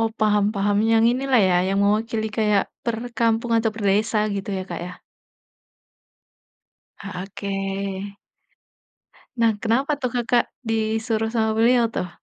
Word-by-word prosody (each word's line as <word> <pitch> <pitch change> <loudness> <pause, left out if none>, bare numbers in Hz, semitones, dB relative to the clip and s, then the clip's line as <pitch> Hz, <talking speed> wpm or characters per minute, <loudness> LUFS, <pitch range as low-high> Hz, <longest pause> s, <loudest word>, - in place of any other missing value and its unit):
Oh, 225 - +2
paham 210 -1 +3
paham 205 +1 +1
yang 225 0 +4
inilah 260 -1 +2
ya, 180 - +3
yang 195 +1 0
mewakili 220 +1 0
kayak 210 -2 +3 0.2
perkampung 230 0 -1
atau 225 0 +1
perdesa 210 +1 +1 0.2
gitu 195 0 -5
ya, 185 - -4
Kak, 170 - -4
ya. 180 - -7 2.1
Ah, 195 -3 -6
Oke. 195 0 -4 1.2
Nah, 230 -1 +4
kenapa 265 +6 0
tuh 255 - 0
Kakak 240 0 +1 0.2
disuruh 225 0 -1
sama 220 -1 0
beliau 235 +2 +3
tuh? 180 - -3
220 Hz, 130 wpm, -23 LUFS, 200-230 Hz, 2.1 s, yang